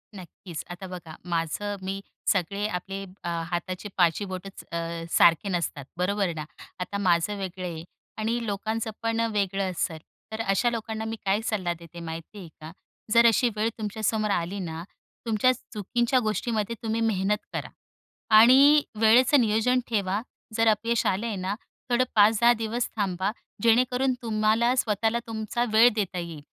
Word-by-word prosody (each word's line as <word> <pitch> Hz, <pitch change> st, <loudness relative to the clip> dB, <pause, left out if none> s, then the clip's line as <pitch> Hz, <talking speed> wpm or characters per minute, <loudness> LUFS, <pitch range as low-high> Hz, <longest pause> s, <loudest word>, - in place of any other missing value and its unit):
नक्कीच. 175 Hz, -2 st, -8 dB
आता 180 Hz, +2 st, -7 dB
बघा, 175 Hz, -3 st, -9 dB
माझं 175 Hz, +4 st, -2 dB
मी 195 Hz, +1 st, -3 dB, 0.3 s
सगळे 200 Hz, +2 st, +1 dB
आपले 195 Hz, 0 st, -4 dB, 0.2 s
अ, 175 Hz, -, -2 dB, 0.2 s
हाताचे 185 Hz, +3 st, -3 dB
पाचही 175 Hz, +2 st, +3 dB
बोटंच 185 Hz, +1 st, -7 dB
अ, 170 Hz, -, -2 dB, 0.3 s
सारखे 170 Hz, +4 st, +4 dB
नसतात, 170 Hz, -6 st, -2 dB
बरोबर 190 Hz, 0 st, 0 dB
ना. 155 Hz, -1 st, -5 dB, 0.3 s
आता 180 Hz, +2 st, -3 dB
माझं 185 Hz, +1 st, +1 dB
वेगळं 185 Hz, -1 st, -5 dB
आहे 165 Hz, -2 st, -5 dB, 0.3 s
आणि 230 Hz, +2 st, -1 dB
लोकांचं 220 Hz, +2 st, -2 dB
पण 230 Hz, 0 st, 0 dB
वेगळं 195 Hz, -2 st, 0 dB
असेल. 165 Hz, -2 st, -2 dB, 0.3 s
तर 220 Hz, +1 st, -3 dB
अशा 210 Hz, +3 st, +2 dB
लोकांना 220 Hz, -1 st, -4 dB
मी 225 Hz, 0 st, -3 dB
काय 195 Hz, +2 st, +2 dB
सल्ला 185 Hz, -6 st, -1 dB
देते 170 Hz, 0 st, -12 dB
माहिती 165 Hz, +4 st, -7 dB
आहे 180 Hz, -, -9 dB
का? 155 Hz, +1 st, -8 dB, 0.4 s
जर 235 Hz, +1 st, +6 dB
अशी 235 Hz, +2 st, +3 dB
वेळ 215 Hz, +1 st, +1 dB
तुमच्यासमोर 215 Hz, 0 st, -1 dB
आली 185 Hz, +1 st, -1 dB
ना, 165 Hz, -3 st, -5 dB, 0.4 s
तुमच्या 225 Hz, +2 st, +3 dB
चुकीच्या 240 Hz, +2 st, -1 dB
गोष्टीमध्ये 220 Hz, 0 st, -1 dB
तुम्ही 225 Hz, 0 st, -1 dB
मेहनत 210 Hz, -2 st, +1 dB, 0.2 s
करा. -, -, -4 dB, 0.7 s
आणि 275 Hz, +6 st, +7 dB, 0.2 s
वेळेचं 250 Hz, +5 st, +6 dB
नियोजन 225 Hz, +3 st, +2 dB
ठेवा, 200 Hz, -2 st, 0 dB, 0.3 s
जर 225 Hz, 0 st, +3 dB
अपयश 225 Hz, +2 st, +2 dB
आले 200 Hz, +5 st, 0 dB
आहे 220 Hz, -, -2 dB
ना, 190 Hz, +1 st, -2 dB, 0.3 s
थोडं 245 Hz, +1 st, +3 dB
5-10 220 Hz, +3 st, +6 dB
दिवस 230 Hz, +1 st, -2 dB
थांबा, 190 Hz, -1 st, 0 dB, 0.3 s
जेणेकरून 250 Hz, +3 st, +3 dB
तुम्हाला 225 Hz, +2 st, +2 dB
स्वतःला 225 Hz, -1 st, +1 dB
तुमचा 220 Hz, +1 st, -2 dB
वेळ 225 Hz, +3 st, +8 dB
देता 200 Hz, -4 st, -2 dB
येईल 170 Hz, -3 st, -6 dB
210 Hz, 150 wpm, -26 LUFS, 185-225 Hz, 0.7 s, वेळ